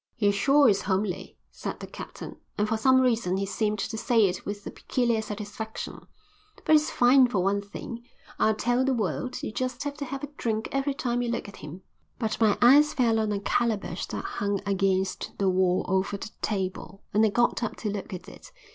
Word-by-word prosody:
"He 205 -4 +3
sure 275 +8 +4
is 200 -3 +3
homely," 190 -1 -2
said - - -6
the - - -6
captain, - - -9 0.2
and 210 - +1
for 225 - 0
some 260 +4 +4
reason 225 -7 +1
he 195 - -1
seemed 210 +1 -1
to 220 +2 -3
say 230 -4 +4
it 185 -1 -2
with 205 0 -5
a - - -5
peculiar 235 -4 0
satisfaction. 215 +1 -6 0.6
"But - - +1
he's 305 0 +5
fine 255 +1 +5
for 200 -7 0
one 200 +1 +1
thing, 230 +3 -8 0.4
I'll 220 - +3
tell 245 +3 +1
the 265 0 +1
world; 185 - -2
you - - -3
just 255 +3 -3
have 285 -1 -3
to 285 - -4
have 275 +1 -6
a - - -2
drink 220 -1 -2
every 275 0 0
time 245 -2 -1
you 240 - -1
look 235 - -2
at 200 - -11
him." 155 +6 -9 0.3
But 225 -1 -2
my 215 -2 +4
eyes 295 +5 +6
fell 230 -3 +3
on 215 -1 0
a 205 - -1
calabash 220 +1 -1
that - - -5
hung 205 - -1
against 195 -1 0
the 195 -1 +2
wall 185 0 +2
over 190 +2 0
the 215 - -8
table, 190 -1 -3
and 210 +2 +4
I 220 - +5
got 240 +4 +1
up 230 - -2
to 210 - -3
look 205 +1 -5
at 185 0 -7
it. - - -13
215 Hz, 210 wpm, -27 LUFS, 200-245 Hz, 0.6 s, eyes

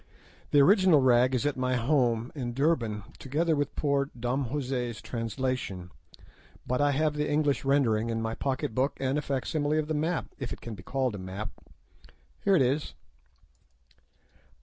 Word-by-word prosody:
The 145 - +4
original 185 0 +6
rag 130 0 +4
is 125 - 0
at 145 - +1
my 130 0 0
home 120 -2 +1
in 120 -5 -4
Durban, 120 - +1 0.2
together 155 +4 0
with 145 -1 -2
poor 140 -1 +1
Dom 125 +3 -1
José's 125 -5 -2
translation, 115 -6 -3 0.7
but 125 +2 0
I 145 - +4
have 150 +2 +1
the 150 0 -1
English 145 -1 +1
rendering 120 -5 +2
in 115 -1 -1
my 115 0 -2
pocket 130 -2 -2
book, 130 +4 0
and 135 +2 0
a - - -2
facsimile 145 +2 -1
of 155 -1 0
the 155 - -1
map, 160 +3 -1
if 130 -4 -4
it - - -6
can 115 - -7
be 100 - -9
called 130 +3 -1
a 100 - -6
map. 95 +1 -5 0.9
Here 195 - +4
it 145 - +5
is." 135 +4 -1
135 Hz, 170 wpm, -28 LUFS, 120-145 Hz, 0.9 s, original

